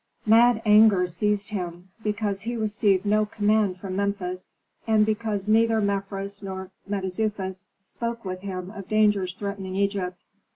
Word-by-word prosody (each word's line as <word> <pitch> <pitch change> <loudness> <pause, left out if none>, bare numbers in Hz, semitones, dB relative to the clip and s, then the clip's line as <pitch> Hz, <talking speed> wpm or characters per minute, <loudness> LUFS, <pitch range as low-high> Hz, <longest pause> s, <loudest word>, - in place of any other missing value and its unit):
Mad 225 +1 +5
anger 210 -3 +6
seized 205 +4 -1
him, 180 -2 -5
because 210 -2 -1
he 235 +4 -3
received 210 -3 +1
no 210 +1 +3
command 210 -2 +1
from 185 -1 -5
Memphis, 195 -2 -2 0.4
and 215 -1 +4
because 215 -2 -2
neither 225 +1 +4
Mefres 200 0 -2
nor 190 -1 -6 0.2
Mentezufis 190 -1 -2 0.2
spoke 235 +2 -5
with 185 -1 -4
him 185 -1 -6
of 200 -3 -9
dangers 205 -4 +2
threatening 200 -2 -5
Egypt. 195 -2 -1
200 Hz, 135 wpm, -25 LUFS, 190-215 Hz, 0.4 s, anger